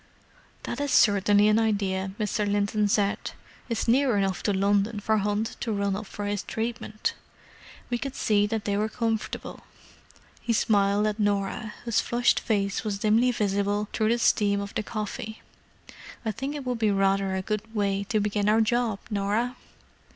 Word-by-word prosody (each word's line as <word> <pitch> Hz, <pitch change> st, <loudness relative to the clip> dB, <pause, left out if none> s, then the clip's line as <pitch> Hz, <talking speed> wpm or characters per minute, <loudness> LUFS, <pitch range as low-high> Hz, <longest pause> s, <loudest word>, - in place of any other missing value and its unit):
"That 250 Hz, -, -4 dB
is 285 Hz, -, -1 dB
certainly 205 Hz, 0 st, +5 dB
an 215 Hz, +1 st, +4 dB
idea," 195 Hz, -3 st, 0 dB
Mr. 210 Hz, -1 st, 0 dB
Linton 205 Hz, +1 st, +1 dB
said. 205 Hz, 0 st, +1 dB, 0.5 s
"It's 230 Hz, 0 st, -1 dB
near 250 Hz, -1 st, +3 dB
enough 195 Hz, -2 st, 0 dB
to 205 Hz, -, 0 dB
London 200 Hz, +2 st, +1 dB
for 220 Hz, +1 st, +1 dB
Hunt 210 Hz, +2 st, -1 dB
to 230 Hz, -, -2 dB
run 200 Hz, -2 st, 0 dB
up 210 Hz, +1 st, -6 dB
for 205 Hz, -, -6 dB
his 205 Hz, -1 st, -1 dB
treatment. 225 Hz, -1 st, -3 dB, 0.8 s
We 240 Hz, -, 0 dB
could 275 Hz, +1 st, -5 dB
see 205 Hz, -1 st, +2 dB
that 220 Hz, 0 st, -3 dB
they 200 Hz, -, 0 dB
were 215 Hz, +1 st, 0 dB
comfortable." 225 Hz, -1 st, -3 dB, 0.8 s
He 235 Hz, -, 0 dB
smiled 205 Hz, -1 st, +2 dB
at 215 Hz, 0 st, -1 dB
Norah, 205 Hz, +1 st, -1 dB
whose 230 Hz, -1 st, +2 dB
flushed 240 Hz, +1 st, +2 dB
face 200 Hz, -3 st, -1 dB
was 210 Hz, -2 st, -2 dB
dimly 220 Hz, +4 st, +3 dB
visible 205 Hz, -2 st, 0 dB
through 215 Hz, -1 st, +1 dB
the 235 Hz, -, +3 dB
steam 205 Hz, -3 st, +2 dB
of 200 Hz, 0 st, -5 dB
the -, -, -1 dB
coffee. 215 Hz, 0 st, -5 dB, 0.8 s
"I 220 Hz, -, +1 dB
think 270 Hz, +7 st, -4 dB
it 285 Hz, -3 st, -6 dB
would 250 Hz, -2 st, -2 dB
be 220 Hz, -1 st, +2 dB
rather 195 Hz, -1 st, +1 dB
a 190 Hz, -, -2 dB
good 215 Hz, +2 st, -4 dB
way 200 Hz, -1 st, 0 dB
to 215 Hz, +1 st, 0 dB
begin 205 Hz, 0 st, 0 dB
our 220 Hz, +1 st, +4 dB
job, 230 Hz, -1 st, +1 dB
Norah." 210 Hz, +5 st, 0 dB
210 Hz, 175 wpm, -26 LUFS, 200-225 Hz, 0.8 s, certainly